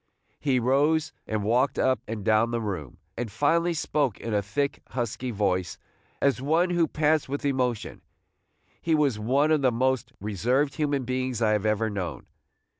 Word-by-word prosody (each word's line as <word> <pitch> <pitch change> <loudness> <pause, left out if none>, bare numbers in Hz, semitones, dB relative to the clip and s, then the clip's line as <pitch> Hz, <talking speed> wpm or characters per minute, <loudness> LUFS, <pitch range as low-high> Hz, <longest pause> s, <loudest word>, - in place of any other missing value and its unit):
He 135 -4 +1
rose 145 +5 +2
and 110 -1 -1
walked 125 +5 +2
up 130 0 +2
and 110 -2 -5
down 110 +1 +3
the 120 0 -1
room, 90 - -5 0.2
and 115 -2 -4
finally 165 - +2
spoke 150 - 0
in 115 - -4
a 105 - +2
thick, 140 +8 -2
husky 120 +1 -3
voice, 95 -5 -1 0.4
as 140 -2 +2
one 165 +6 +2
who 170 -2 +2
pants 155 -1 +1
with 140 +1 -3
emotion. 125 -5 -1 0.8
He 165 -1 +2
was 140 -8 +1
one 135 +8 +2
of 155 -2 +3
the 130 -2 +3
most 130 +1 0
reserved 120 +8 0
human 145 -4 0
beings 130 -1 -2
I 110 -2 +2
have 105 0 +1
ever 110 +1 +1
known. 100 -4 -4
130 Hz, 170 wpm, -26 LUFS, 110-145 Hz, 0.8 s, down